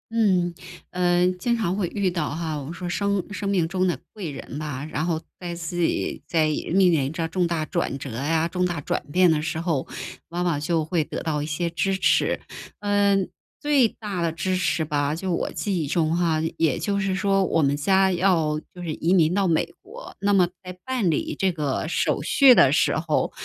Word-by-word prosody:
嗯， 185 -6 +2 0.4
呃， 180 0 +2
经 235 +5 +1
常 195 -5 -1
会 195 -4 0
遇 195 0 -1
到 170 -4 -2
哈， 160 -1 -3
我 140 - -7
们 155 - -6
说 175 0 -5
生 200 +1 -1
生 205 0 -4
命 190 -4 +2
中 185 0 +1
的 175 - 0 0.2
贵 200 -7 -5
人 140 +1 -7
吧， 145 -3 -4
然 155 - -1
后 165 -2 -1 0.2
在 175 -1 -5
自 170 +1 -5
己 170 - 0
在 160 -3 +2
面 155 +1 -2 0.2
临 145 -3 +1
着 165 0 -2
重 180 0 +1
大 165 -2 -1
转 135 - -2
折 140 - -7
呀， 160 +8 0
重 180 +1 0
大 175 -4 -2
转 - - -2
变 180 -2 +5
的 155 -1 +1
时 160 +1 -3
候， 165 -6 -1 0.4
往 175 +1 -3
往 170 -5 0
就 160 +1 0
会 160 0 0
得 - - -5
到 155 -3 -1
一 - - -2
些 160 +3 -2
支 175 +3 0
持。 - - +2 0.4
嗯， 200 -2 +2 0.3
最 290 -5 +4
大 205 -5 -5
的 165 -1 0
支 185 +2 -1
持 180 -3 +1
吧， 145 -1 0
就 185 +2 -2
我 - - -1
记 195 -5 -2
忆 150 - -2
中 160 +1 +1
哈， 165 -3 +1 0.2
也 160 -4 +2
就 200 -1 -1
是 195 -1 0
说 195 -1 +2
我 165 -2 +1
们 140 0 +2
家 190 +5 +3
要 170 -4 +2 0.2
就 180 - -8
是 165 -3 -3
移 170 +4 +1
民 170 -3 +4
到 195 0 +2
美 165 0 +2 0.2
国， 465 +6 -11
那 200 +1 +2
么 185 -3 +5 0.2
在 180 0 -8
办 255 -8 0
理 155 - -1
这 190 -1 +2
个 150 -3 -2
手 165 - 0
续 275 -3 +7
的 135 - +6
时 145 - +2
候， 160 -1 0
175 Hz, 230 characters per minute, -24 LUFS, 160-190 Hz, 0.4 s, 续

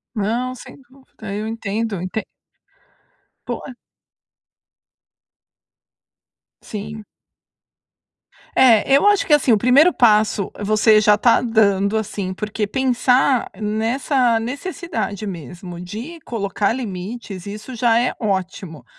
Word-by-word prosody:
Não, 235 +5 -1
sem 260 - -13
dúvida, 260 -6 -11
eu 210 - -3
entendo, 220 -2 -3
entend 185 +4 -4 1.2
Pô. - - -5 3.0
Sim. 215 0 -7 1.5
É, 240 -5 +5
eu 285 - +3
acho 410 -1 +4
que 305 - +4
assim, 295 -4 +4
o 220 - +5
primeiro 270 - +5
passo 215 -4 +3
você 215 +1 +4
já 210 -1 +5
está 230 +3 +3
dando, 210 -3 +2
assim, 200 -3 -3
porque 210 +2 -3
pensar 255 +2 +2
nessa 230 +3 +1
necessidade 255 - -4
mesmo 175 - -8
de 230 - -8
colocar 200 -5 -2
limites, 200 -4 -6
isso 215 +5 -8
já 235 0 +3
é 250 - 0
ótimo, 185 - -4
220 Hz, 105 wpm, -20 LUFS, 200-250 Hz, 3.0 s, É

